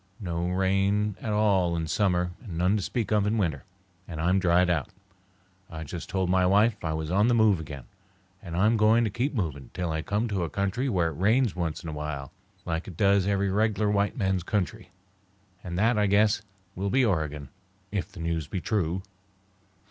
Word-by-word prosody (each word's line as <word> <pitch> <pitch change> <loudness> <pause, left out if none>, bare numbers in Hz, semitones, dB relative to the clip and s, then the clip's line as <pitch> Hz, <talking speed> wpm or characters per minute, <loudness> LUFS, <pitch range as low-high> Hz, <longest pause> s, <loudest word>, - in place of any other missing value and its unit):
No 85 -3 -2
rain 95 +2 +1
at 110 - -3
all 100 -5 +2
in 80 -1 -2
summer 90 0 +1
and 95 -9 -7
none 90 +4 +2
to 105 - 0
speak 110 +1 -2
of 105 -1 +3
in 110 +2 +1
winter, 80 -10 -1 0.4
and 80 -3 -6
I'm 90 +4 +2
dried 90 -1 +3
out. 85 -6 0 0.8
I 80 0 -6
just 85 +3 -7
told 95 -2 0
my 90 +1 +3
wife 105 +4 +3
I 80 -1 -1
was 80 0 -3
on 100 +4 +3
the 120 - +3
move 110 -5 +4
again, 75 -4 -7 0.6
and 85 -3 -6
I'm 110 +5 +3
going 110 +2 +4
to 110 - -1
keep 130 +5 -1
moving 75 - -3
till 90 -3 -2
I 80 0 -1
come 105 +7 -1
to 95 -4 -1
a 85 - -2
country 100 - -1
where 90 -7 +1
it 80 -1 -8
rains 110 +3 +3
once 85 -1 -3
in 85 - -5
a - - -5
while, 75 -3 -5 0.3
like 80 +1 -3
it 90 - -9
does 100 -1 +3
in - - +2
every 100 -1 +1
reg'lar 105 0 +1
white 100 +3 0
man's 95 -4 0
country; 90 +1 -2 0.7
and 85 -1 -5
that, 110 +3 +3
I 105 - +3
guess, 105 +1 +3 0.3
will 100 +2 -2
be 130 +4 +3
Oregon, 75 - -1 0.4
if 100 -1 -3
the 90 -4 -9
news 80 -3 -2
be 95 - -3
true." 95 -2 -1
95 Hz, 205 wpm, -27 LUFS, 85-105 Hz, 0.8 s, move